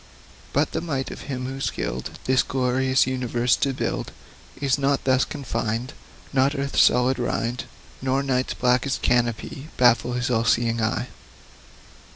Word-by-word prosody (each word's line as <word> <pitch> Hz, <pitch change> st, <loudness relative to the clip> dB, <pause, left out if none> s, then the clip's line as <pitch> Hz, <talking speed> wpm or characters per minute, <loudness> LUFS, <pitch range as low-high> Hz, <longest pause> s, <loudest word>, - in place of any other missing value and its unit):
But -, -, +1 dB
the -, -, -2 dB
might 140 Hz, -6 st, -3 dB
of -, -, -8 dB
Him, 125 Hz, -2 st, -3 dB
who 135 Hz, +1 st, -5 dB
skilled 65 Hz, -, -3 dB
This 130 Hz, 0 st, +4 dB
great 130 Hz, 0 st, +1 dB
universe 125 Hz, -1 st, +1 dB
to 140 Hz, -, +1 dB
build, 130 Hz, -, -3 dB, 0.5 s
Is 140 Hz, 0 st, +1 dB
not 140 Hz, 0 st, +1 dB
thus 130 Hz, -1 st, +3 dB
confined; 120 Hz, -2 st, -3 dB, 0.4 s
Not 135 Hz, +2 st, +3 dB
earth's 140 Hz, -1 st, +1 dB
solid 125 Hz, +1 st, +4 dB
rind, 120 Hz, 0 st, -2 dB, 0.4 s
Nor 135 Hz, +1 st, +1 dB
night's 130 Hz, -1 st, 0 dB
blackest 125 Hz, +2 st, +1 dB
canopy, 120 Hz, +3 st, 0 dB
Baffle 120 Hz, -1 st, +4 dB
His 125 Hz, +1 st, -1 dB
all 115 Hz, -1 st, +2 dB
seeing 115 Hz, +1 st, +2 dB
eye. 110 Hz, +3 st, -1 dB
130 Hz, 145 wpm, -24 LUFS, 120-135 Hz, 0.5 s, This